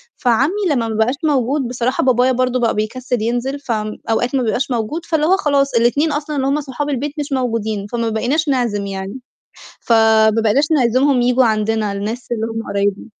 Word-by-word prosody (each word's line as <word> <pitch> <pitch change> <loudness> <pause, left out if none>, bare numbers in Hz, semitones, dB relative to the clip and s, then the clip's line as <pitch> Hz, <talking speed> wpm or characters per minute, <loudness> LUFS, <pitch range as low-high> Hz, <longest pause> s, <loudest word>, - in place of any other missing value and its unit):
فعمي 250 +4 +2 0.2
لمّا 240 -6 0
ما 220 - -3
بقاش 220 +5 +1
موجود 275 -2 +1
بصراحة 250 +1 -1
بابايا 255 0 +3
برضه 255 0 0
بقى 235 -2 +1
بيكسّل 240 +2 -2
ينزل 245 +5 -2
فأوقات 225 0 -2
ما 260 - +1
بيبقاش 250 +4 -1
موجود، 245 +9 -2
فاللي 315 -2 0
هو 375 +4 +4
خلاص 280 -5 +1
الإتنين 245 +7 +2
أصلًا 295 +1 -3
اللي 270 -1 0
هُم 285 +2 +1
صحاب 290 +1 -4
البيت 285 +1 -2
مش 290 0 -4
موجودين 225 -6 -1
فما 235 -1 -1
بقيناش 255 +9 0
نعزم 235 -7 0
يعني، 195 +5 -5 0.6
فما 220 -1 +4
بقيناش 275 +8 +2
نعزمهم 260 -1 +3
ييجوا 250 +1 +3
عندنا 215 -1 0
الناس 210 +5 -4
اللي 225 -2 -1
هُم 225 0 -5
قرايبنا. 200 0 -1
245 Hz, 175 wpm, -18 LUFS, 220-275 Hz, 0.6 s, هو